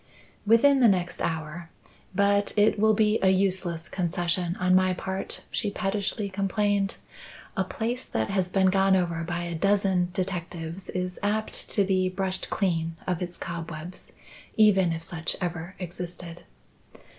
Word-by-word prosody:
"Within 265 +5 +6
the 245 - +6
next 180 -4 0
hour. 160 +1 -3 0.5
But 200 +1 +2
it 210 0 +4
will 220 0 +4
be 215 +1 +3
a 190 - +4
useless 185 -3 0
concession 175 0 -1
on 185 -1 +2
my 185 0 +4
part," 190 +1 -3
she 210 - -1
pettishly 200 +1 -2
complained. 200 +1 0 0.6
"A - - +1
place 245 0 -3
that 110 0 -2
has 190 -2 0
been 190 0 +3
gone 195 0 +4
over 170 -3 0
by 175 +1 -3
a 170 0 -4
dozen 190 0 +2
detectives 180 -1 -4
is 180 0 -3
apt 210 +2 -1
to 200 - +2
be 185 -1 +1
brushed 190 0 -2
clean 165 -4 0
of 180 -2 -1
its 175 -1 -4
cobwebs, 170 0 -7 0.5
even 195 -5 +5
if 165 0 -4
such 165 0 0
ever 175 0 -4
existed." 175 -1 -7
185 Hz, 145 wpm, -27 LUFS, 175-200 Hz, 0.6 s, Within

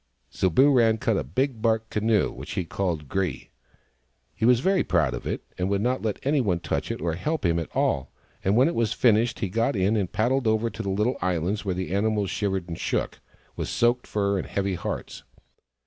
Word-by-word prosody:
So 95 - +1
Booran 120 - +4
cut - - +1
a - - -1
big 115 - -1
bark 110 -1 +1
canoe, 110 -1 +2
which - - -8
he 90 - -2
called 85 -5 -2
Gre. 90 0 0 1.0
He 110 - -1
was 125 0 +5
very 190 +6 +2
proud 80 -8 +1
of - - -5
it, - - -3 0.2
and 90 +1 0
would 100 0 0
not 125 +2 0
let 110 -2 -1
anyone 130 - +1
touch 85 - -2
it - - -3
or 85 0 -1
help 150 - -2
him 85 -1 +2
at 85 - -5
all; 65 - 0 0.3
and 95 +2 +2
when 125 +5 +5
it 170 - 0
was 115 -2 0
finished 115 0 +2
he 100 - 0
got 115 +8 0
in 100 +3 +2
and 100 -5 -1
paddled 125 +3 +1
over 110 +1 +1
to - - -6
the 100 - -3
little 105 +6 0
islands 90 +3 -1
where 95 -2 -1
the 95 0 -3
animals 105 -1 +1
shivered 95 -3 -1
and 85 -2 -6
shook, - - -2 0.4
with - - -3
soaked 120 +1 +1
fur 100 -1 0
and - - -5
heavy 100 -1 -1
hearts. 90 - -5
105 Hz, 210 wpm, -25 LUFS, 90-115 Hz, 1.0 s, was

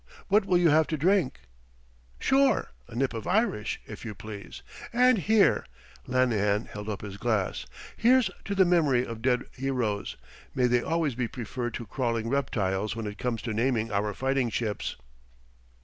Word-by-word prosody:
What 205 +1 +4
will 180 -2 +3
you 175 -3 +4
have 155 +1 +4
to 155 - -2
drink?" 165 - +2 0.8
"Sure. 270 0 +2 0.2
A 115 - -11
nip 130 +1 0
of 115 - -5
Irish, 195 - 0
if 110 - -9
you 110 -3 -6
please. 100 0 -9 0.3
And 250 -1 +4
here" 210 +3 +4 0.4
Lanahan 110 -5 +2
held 105 +1 -7
up 105 - -4
his 100 -2 -7
glass 110 -3 -1 0.3
"here's 250 +1 +4
to 200 - -2
the 190 -1 +5
memory 150 -8 +3
of 115 -1 -7
dead 125 0 +2
heroes 125 -6 -2 0.4
may 125 - +3
they 125 0 +3
always 160 -2 0
be 120 0 -2
preferred 120 +1 -5
to 115 - -5
crawling 115 -2 -1
reptiles 110 -6 -1
when 115 -1 -4
it 105 0 -6
comes 120 -2 -2
to 115 - -2
naming 115 0 0
our 100 +1 0
fighting 135 -2 0
ships!" 110 -2 -2
125 Hz, 165 wpm, -28 LUFS, 110-160 Hz, 0.8 s, the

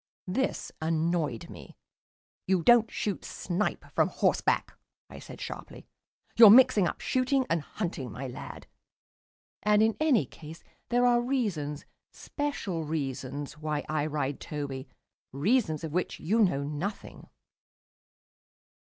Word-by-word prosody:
This 235 +9 -2
annoyed 160 -5 -1
me. - - -12 0.7
"You 185 -2 +2
don't 235 0 +6
shoot 205 -2 -3
snipe 185 +3 -3
from - - +3
horseback," - - +1 0.4
I - - -9
said - - -11
sharply. - - -8 0.5
"You're 225 -2 +10
mixing 215 -5 +7
up - - -5
shooting 260 +1 +1
and 165 -1 +2
hunting, 145 - -5
my 125 +7 -6
lad. 125 - -9 1.0
And 210 0 +4
in 220 0 +2
any 290 - +3
case 160 +5 -12 0.3
there 245 +1 +3
are 240 -1 +4
reasons, 200 - -2 0.3
special 245 - -4
reasons, 145 -1 -4
why 155 -1 -2
I 155 -1 -1
ride 145 -2 -2
Toby 140 -3 -5 0.4
reasons 165 - +1
of 160 - -4
which 180 +1 -2
you 210 +8 +1
know 160 -10 +3
nothing." 150 +8 -5
165 Hz, 125 wpm, -29 LUFS, 145-220 Hz, 1.0 s, You're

